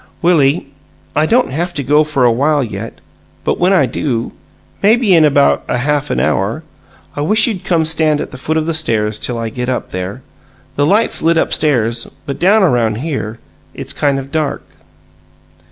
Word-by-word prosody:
"Willie, 160 -3 +3 0.5
I 155 +2 +2
don't 245 - +2
haf 175 +5 -3
to 140 - -2
go 150 +4 +3
for 150 -4 0
a 120 - +5
while 145 +4 +1
yet, 110 -1 -7 0.4
but - - -1
when 180 +2 +3
I 190 - +4
do 120 -5 -3 0.5
maybe 220 0 +3
in 165 -2 +5
about 145 -2 +3
a - - -1
half 145 +3 -1
an - - -1
hour 110 +11 -1 0.5
I 145 - -3
wish 215 +8 +3
you'd 210 -7 -3
come 165 -3 +1
stand 155 -2 +1
at - - -5
the 130 - -9
foot 155 +4 -1
of 155 - 0
the 165 - -1
stairs 110 -9 0
till 120 - -2
I 115 -1 -3
get 125 +3 -4
up 125 - -3
there. 95 +7 -5 0.5
The 145 0 +1
light's 215 +6 +3
lit 165 +1 +2
up - - +1
stairs, 120 -6 +1 0.2
but 140 - -5
down 200 +4 +4
around 120 - +2
here 120 -4 -4 0.4
it's - - -3
kind 140 -2 0
of 135 0 -7
dark." 155 -2 -2
145 Hz, 190 wpm, -15 LUFS, 120-165 Hz, 0.5 s, a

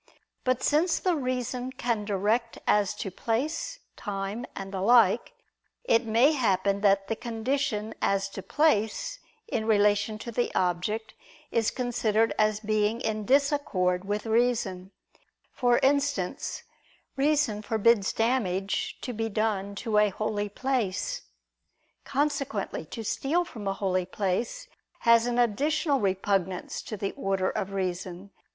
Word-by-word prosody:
But 255 -1 0
since 320 +3 +3
the 365 -2 +1
reason 255 -2 -2
can 235 -5 -1
direct 215 +4 0
as 205 -2 +2
to 195 - -5
place, 310 - -2 0.2
time, 200 +3 -4
and 195 0 -6
the 190 - -2
like, 230 0 +4 0.5
it 230 - +2
may 235 +7 +5
happen 200 -7 +1
that 195 -1 +3
the 225 - -1
condition 225 -1 -2
as 195 0 +1
to 195 - -7
place, 305 - +1 0.3
in 220 - -2
relation 205 0 +3
to 235 +2 -7
the 240 +2 0
object, 185 +5 -1 0.4
is 225 -2 +2
considered 225 -3 +1
as 215 0 +2
being 215 +1 +1
in 215 -4 -2
disaccord 260 -10 +2
with 205 +2 -2
reason: 225 -5 +1 0.6
for 245 -2 +3
instance, 280 -6 0 0.5
reason 280 -6 +1
forbids 220 -1 +3
damage 205 -5 0
to 250 - -4
be 225 0 -2
done 200 -2 -1
to 215 0 +1
a 210 0 +4
holy 205 +1 -2
place. 235 -4 -1 0.8
Consequently 275 - -1
to 225 +8 -7
steal 315 +10 0
from 215 -10 -7
a 195 - +1
holy 185 -2 -1
place 215 - -2 0.3
has 230 0 +5
an 240 0 -1
additional 275 - +2
repugnance 190 -2 -1
to 215 - -6
the 195 0 -2
order 195 -1 -1
of 195 - -3
reason. 185 0 -4
220 Hz, 130 wpm, -27 LUFS, 195-250 Hz, 0.8 s, may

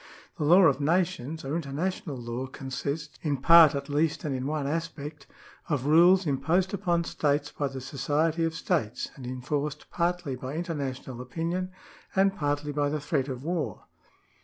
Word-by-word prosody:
The 150 - 0
law 180 +5 +7
of 145 -4 +4
nations 165 -2 0
or 140 +3 -2
international 160 +1 -3
law 120 +2 -4
consists 140 +3 -5
(in 145 -3 0
part 160 +2 +8
at 140 0 -3
least, 150 +2 0
and 150 - -2
in 130 +1 -3
one 150 -1 -1
aspect) 150 -2 -4 0.4
of 140 -4 0
rules 175 +5 +6
imposed 165 +7 +1
upon 175 -4 +1
states 145 -2 0
by 145 - -2
the 135 -1 -6
society 150 +5 0
of 165 0 0
states, 155 - -1
and 130 -2 -8
enforced 145 +4 -3
partly 175 -5 -1
by 130 +3 -6
international 140 -7 -4
opinion 170 +8 -3 0.5
and 195 0 +3
partly 145 -2 -1
by 145 0 0
the 150 +1 -1
threat 145 -2 -1
of 130 -2 -5
war. 170 0 -3
150 Hz, 160 wpm, -28 LUFS, 140-165 Hz, 0.5 s, part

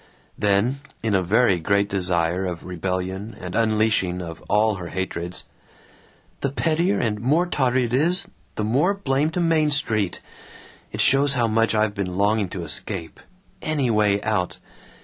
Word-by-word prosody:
Then, 105 +7 +1 0.2
in 110 -2 +1
a 95 - +3
very 100 0 +3
great 100 +4 +2
desire 90 -2 0
of 85 -2 -5
rebellion 95 +4 -4
and 90 0 -6
unleashing 110 -4 +2
of 85 -2 -7
all 110 +1 +3
her 85 -2 -6
hatreds, 90 -1 -4 0.9
"The 140 - -1
pettier 165 +6 +1
and 105 -3 -1
more 150 +9 +3
tawdry 130 -7 +1
it 120 0 -3
is, 165 +8 +2 0.3
the 110 - -2
more 140 - +2
blame 145 -5 0
to 160 - -3
Main 165 -3 +3
Street. 110 -9 0 0.7
It - - -1
shows 135 +1 +4
how 120 -3 +2
much 115 0 +2
I've 105 -1 +2
been 95 -3 -3
longing 100 0 +2
to 90 -1 -5
escape. 80 +2 -5 0.4
Any 145 -6 0
way 105 -2 +3
out! 105 -5 -1
105 Hz, 155 wpm, -23 LUFS, 95-130 Hz, 0.9 s, shows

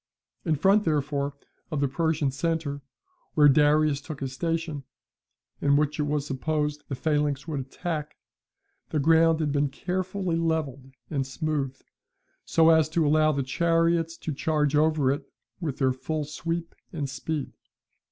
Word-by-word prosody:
In 160 -3 +2
front, 195 +8 +4
therefore, 145 -3 -1 0.3
of 155 -4 -2
the 140 - +2
Persian 150 0 0
centre, 155 -1 -2 0.5
where 150 -1 +7
Darius 150 0 +4
took 150 -1 -7
his 135 -1 -4
station, 165 0 -2 0.8
and 140 0 +4
which 150 +1 0
it 150 - +1
was 145 -1 0
supposed 150 +1 -2
the 135 - -2
phalanx 150 0 0
would 150 -3 -2
attack, 150 +3 -4 0.7
the - - -1
ground 160 +2 +4
had 150 -2 0
been 145 0 +1
carefully 185 +3 -2
levelled 150 -5 -2 0.2
and 135 -3 -1
smoothed, 140 -2 -3 0.6
so 165 0 +5
as 160 -2 +4
to 160 0 +1
allow 155 +1 +4
the 140 -2 -1
chariots 165 +3 +1
to 155 - -4
charge 150 0 +1
over 150 -3 +3
it 140 0 -4 0.3
with 155 -7 -3
their 130 -2 +2
full 155 +4 -3
sweep 165 +3 -4 0.2
and 150 -4 -3
speed. 135 +2 -4
150 Hz, 150 wpm, -26 LUFS, 140-160 Hz, 0.8 s, where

